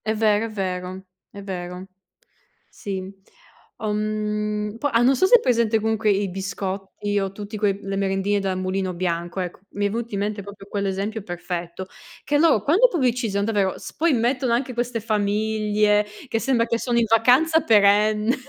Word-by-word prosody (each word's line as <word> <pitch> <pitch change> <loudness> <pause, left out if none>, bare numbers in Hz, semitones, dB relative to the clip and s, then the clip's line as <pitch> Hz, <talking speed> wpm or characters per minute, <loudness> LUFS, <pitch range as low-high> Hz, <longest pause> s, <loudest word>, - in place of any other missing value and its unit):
È 220 0 0
vero, 215 0 +2
è - - -5
vero. 185 -2 -4 0.3
È 200 - -10
vero. 180 -1 -6 0.8
Sì. 195 -2 -5 0.8
Uhm 215 0 -1 0.5
po 290 - +1
ah 230 -4 +2
non 260 +3 +4
so 370 - +3
se 485 - +7
hai 480 - +5
presente 235 - +2
comunque 220 0 +1
i 200 0 0
biscotti 195 +2 -3
o 195 -1 -2
tutti 205 +2 -7
que 200 -2 0
le 195 0 -4
merendine 195 +1 0
della 195 -1 -1
Mulino 185 0 -2
Bianco, 175 0 -3
ecco. 180 0 -6
Mi 205 0 0
è - - -2
venuto 230 0 -4
in 200 - -1
mente 205 0 -3
proprio 200 0 -11
quell'esempio 200 +2 -2
perfetto, 175 0 -5 0.4
che 290 - +1
loro 305 -10 +4
quando 365 - +5
pubblicizzano 240 - 0
davvero, 205 -4 0
s - - -9
poi 325 +1 +2
mettono 245 +1 +1
anche 250 +1 -1
queste 240 0 -2
famiglie 210 0 +1 0.2
che 225 - 0
sembra 240 -2 +1
che 230 0 0
sono 240 -1 0
in 230 - +3
vacanza 255 +9 +4
perenne. 210 +1 +4
210 Hz, 170 wpm, -23 LUFS, 195-230 Hz, 0.8 s, se